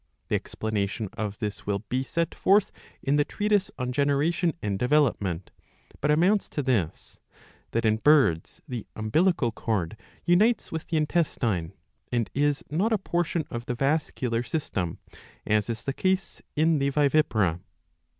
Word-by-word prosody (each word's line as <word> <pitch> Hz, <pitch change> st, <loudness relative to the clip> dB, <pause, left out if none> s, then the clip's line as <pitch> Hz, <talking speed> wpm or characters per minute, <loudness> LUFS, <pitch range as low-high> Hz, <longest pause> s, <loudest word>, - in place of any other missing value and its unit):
The -, -, +2 dB
explanation 105 Hz, -1 st, -2 dB
of 105 Hz, -1 st, -4 dB
this 105 Hz, -2 st, -5 dB
will 100 Hz, 0 st, -1 dB
be 130 Hz, +4 st, 0 dB
set 165 Hz, +5 st, -1 dB
forth 200 Hz, +1 st, +3 dB, 0.3 s
in 140 Hz, +1 st, +2 dB
the 145 Hz, -, +4 dB
treatise 205 Hz, +3 st, 0 dB
on 125 Hz, 0 st, -2 dB
Generation 145 Hz, +5 st, +1 dB
and 100 Hz, -2 st, -2 dB
Development, 115 Hz, -, +1 dB, 0.5 s
but 150 Hz, -, +1 dB
amounts 180 Hz, +7 st, +3 dB
to 145 Hz, -, -2 dB
this, 110 Hz, -, -1 dB, 0.5 s
that 115 Hz, 0 st, -1 dB
in 110 Hz, 0 st, +3 dB
birds 135 Hz, -, +3 dB
the 125 Hz, -6 st, -5 dB
umbilical 125 Hz, -, +2 dB
cord 110 Hz, -6 st, -2 dB, 0.3 s
unites 210 Hz, +7 st, +3 dB
with 160 Hz, -1 st, -4 dB
the 165 Hz, -, 0 dB
intestine, 125 Hz, -, 0 dB, 0.4 s
and 120 Hz, -3 st, 0 dB
is 145 Hz, 0 st, +1 dB
not 190 Hz, +9 st, +1 dB
a 220 Hz, -, +4 dB
portion 170 Hz, -4 st, -1 dB
of 120 Hz, +1 st, -5 dB
the 120 Hz, -, -1 dB
vascular 135 Hz, -4 st, 0 dB
system, 100 Hz, -, -3 dB, 0.5 s
as 105 Hz, 0 st, +1 dB
is 115 Hz, -1 st, -3 dB
the 135 Hz, -, -2 dB
case 190 Hz, +5 st, -1 dB
in 160 Hz, 0 st, +3 dB
the 140 Hz, 0 st, +2 dB
vivipara.' 140 Hz, -, +2 dB
135 Hz, 150 wpm, -27 LUFS, 110-160 Hz, 0.5 s, the